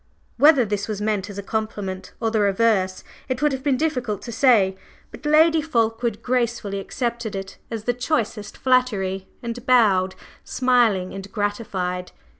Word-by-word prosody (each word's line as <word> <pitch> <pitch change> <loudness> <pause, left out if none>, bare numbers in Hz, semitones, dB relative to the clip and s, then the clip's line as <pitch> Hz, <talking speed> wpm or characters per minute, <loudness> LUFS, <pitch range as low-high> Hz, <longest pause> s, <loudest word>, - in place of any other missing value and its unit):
Whether 290 -4 +6
this 205 -1 -2
was 215 -2 -3
meant 210 -1 -1
as 200 - -8
a 200 - -4
compliment 205 -3 -4
or 225 -1 0
the 220 - +1
reverse 200 -2 +2 0.3
it 255 -1 -1
would 295 - +4
have 265 -1 -3
been 275 -2 +1
difficult 250 -10 -1
to 235 - -6
say, 225 -6 +4 0.4
but 295 - -7
Lady 315 +1 +5
Fulkeward 230 -5 -1
graciously 235 -5 -1
accepted 235 +1 -3
it 195 0 -7
as 225 -2 -5
the 245 - +1
choicest 235 -5 -2
flattery, 205 -8 +1 0.2
and 235 0 -5
bowed, 200 -7 +4 0.3
smiling 240 -8 +2
and 195 0 -8
gratified. 195 -4 -3
220 Hz, 155 wpm, -23 LUFS, 200-250 Hz, 0.4 s, Whether